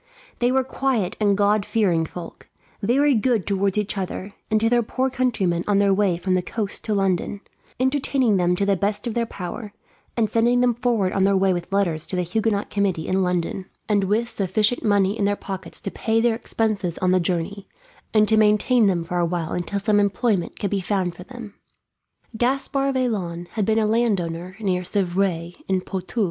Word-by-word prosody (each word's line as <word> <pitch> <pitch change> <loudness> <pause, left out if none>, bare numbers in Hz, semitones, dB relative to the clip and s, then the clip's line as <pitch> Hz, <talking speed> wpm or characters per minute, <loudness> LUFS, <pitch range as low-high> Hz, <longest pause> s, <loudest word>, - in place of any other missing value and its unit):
They 245 +1 +2
were 265 0 +2
quiet 250 -7 -1
and 205 -2 +2
God 205 0 +3
fearing 180 -7 +1
folk; 170 0 -10 0.3
very 275 +7 +3
good 230 -3 +1
towards 200 0 0
each 210 -1 0
other, 190 +1 -5 0.2
and 215 0 +3
to 225 - +2
their 240 +1 +3
poor 260 +3 -1
countrymen 205 -10 0
on 205 -1 +3
their 200 -1 +4
way 190 -3 +2
from 185 +2 -1
the 185 - +2
coast 205 +2 -4
to 215 - 0
London, 195 +1 0 0.4
entertaining 260 -4 +2
them 180 0 +2
to 200 - 0
the 200 0 +3
best 205 +2 -1
of 235 - -2
their 235 0 0
power, 200 +2 -7 0.4
and 225 -2 +2
sending 235 +3 +2
them 245 -1 +3
forward 230 -6 0
on 195 - 0
their 195 0 +4
way 190 0 +3
with 175 +1 -5
letters 175 -6 0
to - - -3
the 180 - 0
Huguenot 205 +3 -1
committee 195 -5 0
in 190 +1 +1
London, 180 +1 -1 0.2
and 205 -2 +2
with 215 +5 +1
sufficient 210 +2 0
money 200 -2 +2
in 205 - 0
their 205 0 +2
pockets 190 -4 -7
to 195 - -4
pay 225 0 0
their 235 0 +3
expenses 215 -6 -2
on 185 0 +1
the 185 - +4
journey, 180 +3 -2 0.4
and 215 -1 +4
to 220 - +3
maintain 215 +2 +4
them 175 -3 +1
for 175 +2 -2
a 175 - +2
while 170 -2 -3
until 180 +3 -2
some 205 0 +2
employment 200 -2 0
could 200 - -2
be 200 -1 0
found 185 -2 -1
for 180 +1 -11
them. 240 -4 -10 0.8
Gaspard 275 +3 0
Vaillant 180 -9 -2
had 215 0 -1
been 220 +1 +2
a 220 - +3
landowner 185 -6 0
near 185 -4 0
Civray, 180 -2 -1
in 190 -1 +1
Poitou. 190 +5 -5
200 Hz, 200 wpm, -23 LUFS, 185-225 Hz, 0.8 s, their